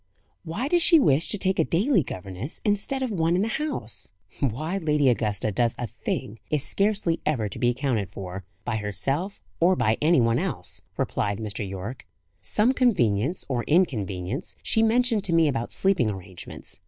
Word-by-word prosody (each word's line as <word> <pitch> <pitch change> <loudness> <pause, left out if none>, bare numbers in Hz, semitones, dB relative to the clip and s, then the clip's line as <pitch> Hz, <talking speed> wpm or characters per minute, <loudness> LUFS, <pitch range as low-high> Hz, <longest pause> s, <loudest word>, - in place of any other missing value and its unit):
"Why 180 +11 -3
does 345 +3 +3
she 335 -1 +7
wish 155 - +3
to 210 - -1
take 190 -1 0
a - - +5
daily 195 - +2
governess 95 - -5
instead 210 +6 0
of 255 - -2
one 170 -3 +1
in 185 - +2
the - - 0
house?" 110 - -3 0.3
"Why 155 - -1
Lady 150 -5 +2
Augusta 110 -2 0
does 115 +4 +1
a 120 - -3
thing, 110 0 -4
is 150 -3 +3
scarcely 200 -5 +1
ever 125 -9 0
to - - -8
be 120 - +3
accounted 120 -6 -1
for, 95 -1 -7 0.2
by 120 -2 -1
herself 135 - -2 0.2
or 180 +3 +4
by 110 -8 +1
any 160 0 +4
one 115 -1 +3
else!" - - -1 0.2
replied 100 -1 -1
Mr. 105 -2 -4
Yorke. 100 +7 -7 0.3
"Some 225 +5 +2
convenience, 160 - +2
or 125 -3 -1
inconvenience, 115 - 0
she 220 - +2
mentioned 225 -1 +3
to 175 - 0
me, 165 -1 +5
about 120 -4 -2
sleeping 190 - +3
arrangements. 95 -3 -8
140 Hz, 175 wpm, -25 LUFS, -, 0.3 s, she